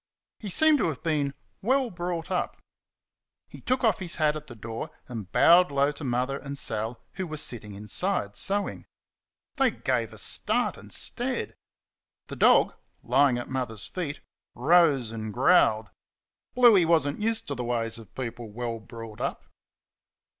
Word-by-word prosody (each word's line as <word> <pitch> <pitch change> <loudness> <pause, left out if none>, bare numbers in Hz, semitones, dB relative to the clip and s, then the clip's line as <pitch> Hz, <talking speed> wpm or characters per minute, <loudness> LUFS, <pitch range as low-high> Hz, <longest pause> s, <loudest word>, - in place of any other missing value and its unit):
He 210 - -6
seemed 310 - +5
to - - +2
have 155 -5 -4
been 145 -4 0 0.3
"well 260 +3 +1
brought 175 -1 -4
up" 180 - -1 0.9
he - - -13
took 255 +1 0
off 220 -4 +3
his 175 -3 -4
hat 155 -1 +2
at 155 - -7
the 120 - -10
door 115 +6 -6 0.2
and 110 -7 -7
bowed 175 +1 +6
low 140 0 +2
to 150 +1 -8
Mother 130 +2 -1
and 140 0 -6
Sal, 110 -1 -2
who 185 -1 -4
were 155 -1 -6
sitting 105 -7 -3
inside, 105 - -1
sewing. 200 - -2 0.7
They - - +4
gave - - -1
a - - -12
start - - 0
and - - -14
stared. 250 0 -2 0.8
The - - -5
dog, - - +5 0.3
lying 130 +1 +3
at 120 - -5
Mother's 125 -5 -3
feet, 155 -6 -5 0.3
rose 140 -4 +4
and 110 -1 -5
growled. 110 +2 +3 0.6
Bluey 235 -7 +7
was 165 -3 +3
n't 145 +7 -4
used 225 +1 -1
to - - -1
the 125 -2 -4
ways 115 -1 -2
of 110 -5 -15
people 120 -3 -5
well 115 +1 -4
brought 115 -1 -10
up. - - -3
140 Hz, 160 wpm, -27 LUFS, 115-180 Hz, 0.9 s, Bluey